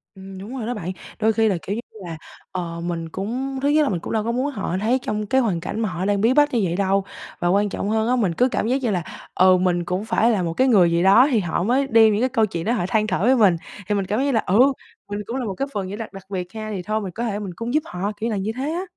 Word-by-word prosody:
Ừm, 190 0 -10
đúng 210 +7 -8
rồi 230 - -4
đó 245 - -2
bạn, 185 -6 -4 0.3
đôi 220 0 +3
khi 225 0 +2
là 190 - 0
kiểu 190 +6 -3
như 235 - -3 0.3
là, 165 -1 -6 0.3
ờ, 170 -2 -4
mình 165 -2 -3
cũng 255 +9 -3
thứ 285 - +2
nhất 300 +1 +4
là - - +1
mình 180 -4 -1
cũng - - -6
đâu 220 -1 +1
có 235 - -1
muốn 260 +4 -1
họ 195 -7 -3
thấy 245 +4 +2
trong 210 -2 -2
cái 265 +6 +2
hoàn 195 -9 0
cảnh 205 +5 -4
mà 220 -3 0
họ 180 +1 -3
đang 200 -1 +1
bí 235 +4 +4
bách 290 -1 +3
như 235 - +2
vậy 175 -2 0
đâu, 195 0 +1 0.4
và 175 - 0
quan 200 +3 +2
trọng 200 - -3
hơn 220 +1 +1
á, 250 - +3
mình 200 -8 +1
cứ 250 +8 +3
cảm - - -1
giác 265 +3 +1
như 235 - 0
là, 180 -4 -1 0.3
ừ, 185 0 +6
mình 180 -1 +1
cũng 180 +4 -2
phải 230 +1 +2
là 195 -5 +1
một 165 -1 -2
cái 260 - +2
người 190 -9 +5
gì 170 +1 +2
đó 235 +8 +7
thì 230 - +3
họ 175 -2 -1
mới 260 +6 +2
đem 225 -3 +5
những 210 - 0
cái 255 - +2
câu 230 -4 +2
chuyện 170 -4 -5
đó 230 - +1
họ 220 -8 0
than 215 +1 +1
thở - - -1
với 255 +4 +5
mình, 205 -8 +5 0.3
thì 210 - +1
mình 195 -1 0
cảm 210 +4 -1
giác 270 - +1
như 280 - +1
là, 225 - +2
ừ, 200 +5 +2 0.5
mình 205 - -3
cũng 235 - -5
là 260 -2 -2
một 200 - -3
cái 275 - -2
phần 195 -2 -2
như 195 - -5
là 225 0 -5
đặc 195 -1 -9
biệt 185 -1 -5
ha, 215 -1 -5
thì 190 - -3
thôi 215 +2 -1
mình 190 -3 -5
có 230 +7 -4
thể 210 -3 -2
mình 195 -4 -6
cũng 230 +2 -4
giúp 305 0 +2
họ, 185 +3 -3
kiểu 225 +2 -2
là 215 - -1
như 195 +3 -2
thế 280 +4 -2
á. 355 +3 -2
210 Hz, 325 wpm, -22 LUFS, 185-235 Hz, 0.5 s, đó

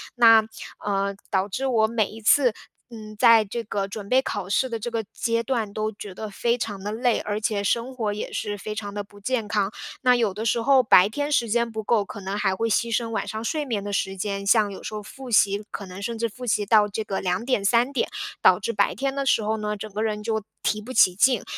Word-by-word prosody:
那， 225 -2 +7 0.4
呃， 200 -1 -1
导 190 0 +1
致 260 +7 -3
我 220 -4 +3
每 220 -3 0
一 225 - -11
次， 245 +2 +4 0.4
嗯， 215 -2 -10
在 230 -2 +6
这 230 +4 -4
个 200 -2 -2
准 200 0 -7
备 260 +1 +4
考 205 -7 -4
试 260 +6 +1
的 230 -2 -3
这 240 - -4
个 230 -1 -1
阶 230 0 0
段 225 -5 -2
都 215 0 -2
觉 205 -2 -9
得 215 +3 -6
非 235 +4 0
常 205 -5 -4
地 205 - -3
累， 240 +2 +1
而 210 0 -3
且 210 -2 -1
生 235 +5 0
活 215 -4 -1
也 210 - -5
是 205 -1 -3
非 210 +1 -5
常 205 -1 -5
地 205 0 -3
不 205 0 -17
健 230 +1 -2
康。 205 -1 0 0.3
那 250 -2 +5
有 225 -5 +1
的 215 +3 -5
时 230 +1 +1
候 265 +2 +5
白 190 -4 +6
天 290 +5 -3
时 235 -5 +2
间 235 +1 +1
不 220 0 -5
够， 215 -1 +2
可 205 - -9
能 195 +2 -4
还 195 -2 +1
会 225 +4 -1
牺 230 +1 +1
牲 230 -2 -1
晚 225 - -3
上 220 +1 -5
睡 300 +4 -2
眠 220 -6 -2
的 205 - -5
时 195 0 -1
间。 200 0 -3
像 210 0 +3
有 195 - -9
时 - - -6
候 210 - -4
复 260 +4 -10
习， 205 -1 +3
可 200 - -6
能 185 +1 -9
甚 230 +2 -3
至 230 +1 0
复 250 +4 -9
习 210 -2 +1
到 210 -1 +5
这 215 +2 -4
个 195 -2 -3
2 180 +3 -1
点、 250 -6 +1
3 235 +5 +3
点， 270 - -1 0.3
导 180 - +6
致 220 - -2
白 - - +1
天 275 0 -2
的 275 - -2
时 240 - +3
候 220 +1 -1
呢， 210 0 -3
整 215 +1 -8
个 215 - -2
人 210 -1 -2
就 220 -1 -1 0.2
提 215 0 0
不 245 - -9
起 185 -6 +5
劲， 250 +1 +3
215 Hz, 270 characters per minute, -24 LUFS, 205-235 Hz, 0.4 s, 那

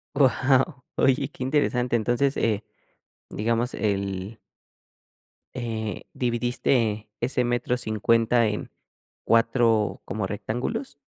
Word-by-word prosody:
Wao, 130 +1 +3
oye 135 +1 +3
qué - - -15
interesante, 130 -3 +1
entonces 120 +5 +1
eh 110 -2 0 0.7
digamos 115 +3 0
el 100 0 -2 1.2
eh, 110 -4 -4
¿dividiste 120 -3 0
ese 125 +1 0
metro 120 0 0
50 115 +1 +2
en 105 0 -4 0.5
4 115 -2 +2
como 105 -2 -3
rectángulos? 120 - -3
120 Hz, 90 wpm, -25 LUFS, 110-125 Hz, 1.2 s, Wao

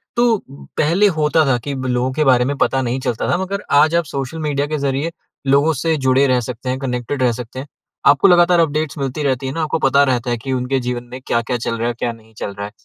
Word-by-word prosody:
तो 235 -2 +3 0.4
पहले 175 +7 +3
होता 155 0 +3
था 130 -3 +2
कि 140 - -1
लोगों 130 -1 -1
के 155 +2 +1
बारे 125 -3 +4
में 140 - -1
पता 135 -1 +1
नहीं 125 +1 -2
चलता 125 -3 -2
था, 175 - +2
मगर 195 +2 -3
आज 155 +3 +4
आप 170 - +3
सोशल 140 +1 -5
मीडिया 145 -2 -1
के 155 0 -2
ज़रिए 140 +3 -1 0.4
लोगों 140 +4 +4
से 165 -1 +2
जुड़े 130 +1 +4
रह 125 -1 +3
सकते 125 +2 -6
हैं, 130 +1 -2
कनेक्टेड 130 0 -2
रह 120 - +4
सकते 125 +2 -7
हैं। 140 - -7 0.4
आपको 145 +7 +6
लगातार 175 -1 +5
अपडेट्स 155 -2 0
मिलती 140 +1 -3
रहती 135 -1 0
हैं 130 - -3
ना, 165 - -2
आपको 155 +1 -1
पता 140 0 +4
रहता 125 -2 0
है 120 - 0
कि 130 +3 -4
उनके 130 +1 0
जीवन 125 -1 -3
में 130 - -7
क्या-क्या 120 +1 0
चल 115 0 -3
रहा 115 - -1
है, 120 - -1
क्या 120 +1 -2
नहीं 110 -1 -16
चल 100 - -5
रहा 100 +1 -5
है। - - -13
135 Hz, 250 wpm, -19 LUFS, 125-155 Hz, 0.4 s, आपको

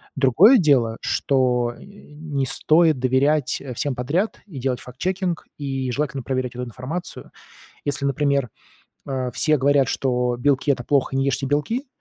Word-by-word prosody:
Другое 150 - +6
дело, 130 - +3
что, 125 -3 +1
э, - - -14
не 150 -8 -5
стоит 155 +2 +3
доверять, 130 +2 +1
э, 130 -3 -7
всем 140 +3 -1
подряд 160 - -1
и 155 -8 -10
делать 125 -1 -1
фактчекинг, 175 +7 -3
и 135 -3 -3
желательно 140 -1 -2
проверять 130 -2 -3
эту 125 - -4
информацию. 130 +9 -7 0.5
Если, 140 -1 -2
например, 140 -2 +1 0.6
э, 130 -2 -2
все 155 -1 +2
говорят, 140 0 +3
что 125 -2 0
белки- 140 +2 +1
это 125 -3 -2
плохо, 135 -1 +1
не 135 - +1
ешьте 135 0 0
белки, 225 - -1
135 Hz, 150 wpm, -22 LUFS, 125-150 Hz, 0.6 s, Другое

